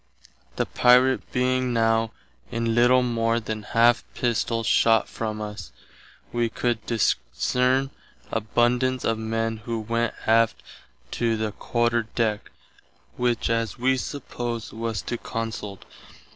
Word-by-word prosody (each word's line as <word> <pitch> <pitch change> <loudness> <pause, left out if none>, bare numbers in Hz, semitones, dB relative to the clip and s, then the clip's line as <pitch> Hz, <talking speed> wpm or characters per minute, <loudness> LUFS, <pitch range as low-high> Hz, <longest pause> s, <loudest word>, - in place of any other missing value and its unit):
The - - 0
Pirate 125 +1 +4
being 125 0 +1
now 115 -1 +2 0.4
in 115 0 -1
little 125 +2 +5
more 115 -1 +1
than 110 -1 -5
half 115 +3 +3
Pistoll 115 -1 0
shott 115 0 +4
from 110 -1 -4
us, 105 -1 -7 0.6
wee 120 -1 +1
could 120 -1 -1
discerne 125 +3 +1 0.4
abundance 120 +3 +1
of 115 -1 0
men 115 0 -1
who 115 +1 -4
went 115 +1 -1
aft 115 0 +3 0.5
to 115 -1 0
the 110 -1 -2
Quarter 120 +1 0
Deck, 110 -3 0 0.7
which 120 -2 0
as 115 -1 -1
wee 130 +2 +2
suppose 120 -4 -5
was 115 -2 -3
to 120 - -4
consult. 110 -3 -5
115 Hz, 120 wpm, -25 LUFS, 115-120 Hz, 0.7 s, little